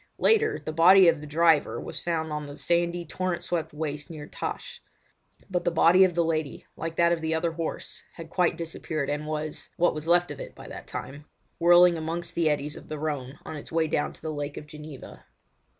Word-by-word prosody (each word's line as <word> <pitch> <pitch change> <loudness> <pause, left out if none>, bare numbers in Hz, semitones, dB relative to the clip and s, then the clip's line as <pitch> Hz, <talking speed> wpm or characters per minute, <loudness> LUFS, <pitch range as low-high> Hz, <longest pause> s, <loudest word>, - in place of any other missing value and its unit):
Later 445 -1 +3
on - - -8
the 155 - -2
body 180 +3 +7
of 165 -3 +3
the 150 - -8
driver 160 0 +3
was - - -6
found 160 -2 -2
on 150 -1 -4
the 145 0 -9
sandy, 170 +1 0
torrent 175 +1 -2
swept 165 -2 -2
waste 150 0 -4
near 155 -3 -7
Täsch; 480 - -6 0.7
but 180 -3 -1
the 175 - +2
body 170 +2 +6
of 180 -3 +2
the 170 - +3
lady, 155 -3 -2
like 165 0 -5
that 170 0 +4
of 170 -1 0
the 160 0 0
other 165 +1 0
horse, 165 0 -5
had 165 -2 -8
quite 180 -2 +2
disappeared, 160 -3 -3
and 150 +1 -3
was—what 155 +3 -1
was 155 +1 -6
left 175 -1 +4
of 145 - -7
it - - -8
by - - -11
that - - -9
time—whirling 170 +4 +2
amongst 165 +2 -4
the 165 -2 +2
eddies 150 0 -1
of - - -12
the 155 - -4
Rhone 145 -3 -4
on 160 - -6
its 150 - -9
way 165 0 +2
down 145 - 0
to - - -14
the 155 -1 -3
Lake 145 0 -4
of - - -7
Geneva. 150 -2 -11
160 Hz, 215 wpm, -27 LUFS, 150-170 Hz, 0.7 s, body